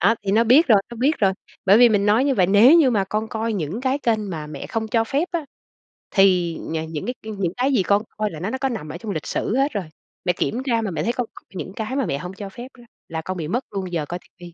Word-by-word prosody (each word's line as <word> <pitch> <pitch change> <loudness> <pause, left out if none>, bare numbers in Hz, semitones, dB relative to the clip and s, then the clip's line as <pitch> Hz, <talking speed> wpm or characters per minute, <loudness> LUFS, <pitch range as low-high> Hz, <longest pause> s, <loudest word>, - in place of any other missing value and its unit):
Đó, 225 +5 +4
thì 195 -1 -1
nó 225 +2 +4
biết 260 +9 +6
rồi, 205 -3 +6
nó 235 - -8
biết 275 +7 +1
rồi. 195 -2 +3 0.3
Bởi 200 +3 +7
vì 245 -1 +8
mình 205 -2 +2
nói 220 +6 +4
như 275 -2 +2
vậy, 185 -4 +3
"Nếu 215 - +7
như 270 -6 +5
mà 200 -4 +1
con 215 +3 -2
coi 225 +1 -2
những 185 +2 -3
cái 260 +2 0
kênh 220 -6 0
mà 155 -3 -5
mẹ 145 -2 -7
không 220 -1 -3
cho 225 +1 +2
phép 290 +9 -1
á, 335 -3 -1 0.7
thì 180 -4 +3
nh - - -6 0.2
những 150 -2 -4
cái 250 - -2
những 195 -5 -3
cái 265 +2 +1
gì 205 - +3
con 200 +2 +3 0.2
coi 215 -1 -1
là 155 - -8
nó 185 +6 -3
nó 260 - -3
có 270 0 -1
nằm 210 -11 -5
ở 155 - -6
trong 205 +4 -6
lịch 155 -6 -4
sử 220 - -1
hết 275 +2 +2
rồi. 200 -5 -2 0.4
Mẹ 180 - +2
kiểm 230 +7 -2
tra 230 -3 +1
mà 210 - -3
mẹ 160 -2 -2
thấy 235 - 0
con 245 -2 -2
coi - - -14
những 190 +1 -6
cái 220 +4 -4
mà 275 - +1
mẹ 140 - -1
hổng 180 +5 -7
cho 200 0 -7
phép 240 +5 -9
đó 240 - -15 0.3
là 160 0 -3
con 185 0 -3
bị 160 - -4
mất 245 - -2
luôn 190 -3 -4
giờ 155 -3 -1
coi 175 - -4
ti - - -25
vi." 175 -1 -11
210 Hz, 300 wpm, -22 LUFS, 185-240 Hz, 0.7 s, vì